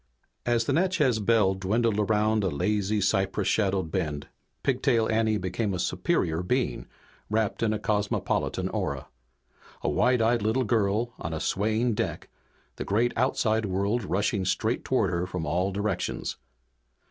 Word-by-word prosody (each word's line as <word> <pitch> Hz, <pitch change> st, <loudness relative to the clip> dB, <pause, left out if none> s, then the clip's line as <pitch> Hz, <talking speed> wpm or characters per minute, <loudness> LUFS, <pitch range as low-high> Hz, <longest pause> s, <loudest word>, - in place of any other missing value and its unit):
As 120 Hz, -1 st, +2 dB
the -, -, 0 dB
Natchez 160 Hz, -10 st, +2 dB
Belle 105 Hz, -2 st, +3 dB
dwindled 105 Hz, +3 st, 0 dB
around 105 Hz, 0 st, +2 dB
a 95 Hz, -, +1 dB
lazy, 105 Hz, +6 st, 0 dB
cypress 95 Hz, +1 st, +1 dB
shadowed 95 Hz, -5 st, +1 dB
bend 75 Hz, -5 st, -2 dB, 0.4 s
Pigtail 115 Hz, -2 st, +2 dB
Anne 110 Hz, -1 st, +2 dB
became 95 Hz, +2 st, -2 dB
a -, -, -4 dB
superior 80 Hz, -1 st, 0 dB
being, 125 Hz, +8 st, -1 dB, 0.4 s
wrapped 110 Hz, -1 st, 0 dB
in 115 Hz, -2 st, +2 dB
a 110 Hz, -, 0 dB
cosmopolitan 105 Hz, -1 st, -1 dB
aura. 65 Hz, -2 st, -3 dB, 0.7 s
A -, -, +1 dB
wide 125 Hz, 0 st, +3 dB
eyed 115 Hz, 0 st, +2 dB
little 110 Hz, +5 st, +1 dB
girl 110 Hz, +1 st, +1 dB
on 80 Hz, -1 st, -4 dB
a -, -, -3 dB
swaying 110 Hz, +7 st, 0 dB
deck, -, -, -3 dB, 0.5 s
the -, -, -3 dB
great 115 Hz, +5 st, +1 dB
outside 110 Hz, -3 st, +1 dB
world 100 Hz, +5 st, 0 dB
rushing 100 Hz, +1 st, 0 dB
straight 95 Hz, -, 0 dB
toward -, -, +1 dB
her 85 Hz, +1 st, -1 dB
from 90 Hz, -3 st, -4 dB
all 90 Hz, +6 st, 0 dB
directions. 100 Hz, -1 st, -2 dB
105 Hz, 145 wpm, -27 LUFS, 95-115 Hz, 0.7 s, Belle